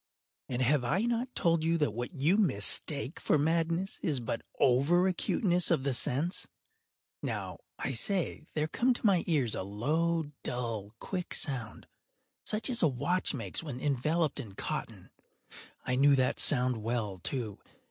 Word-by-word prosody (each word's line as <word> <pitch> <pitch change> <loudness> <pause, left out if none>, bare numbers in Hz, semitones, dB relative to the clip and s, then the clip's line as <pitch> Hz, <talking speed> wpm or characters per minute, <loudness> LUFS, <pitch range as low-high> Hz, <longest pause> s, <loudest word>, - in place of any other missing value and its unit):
And 125 0 0
have 135 +1 +2
I 170 +11 +1
not 240 +2 -1
told 165 -2 +2
you 165 +1 +2
that 150 -7 +1
what 120 +2 -4
you 160 +3 +2
mistake 140 - +2
for - - +2
madness 165 +5 0
is 150 -8 0
but 115 -1 -3 0.2
over 140 +8 +4
acuteness 180 -1 +2
of 130 - +2
the 140 -1 0
sense?—now, 180 - -3 0.2
I - - -2
say, 185 -5 -1
there 155 -1 +1
came 245 +10 +1
to - - -4
my 190 -5 +4
ears 140 -10 +1
a - - -2
low, 150 - -1
dull, 115 -4 -4
quick 180 - -4
sound, 125 -7 -2 0.6
such 215 +1 0
as 240 -2 0
a 165 - +5
watch 175 +7 0
makes - - -4
when 145 -6 -6
enveloped 150 +3 0
in 100 -4 -8
cotton. - - -5 0.7
I 125 - -1
knew 140 +1 +6
that 130 -1 +1
sound 125 -3 +4
well, 110 -4 -2
too. 110 +1 -4
150 Hz, 155 wpm, -31 LUFS, 125-175 Hz, 0.7 s, knew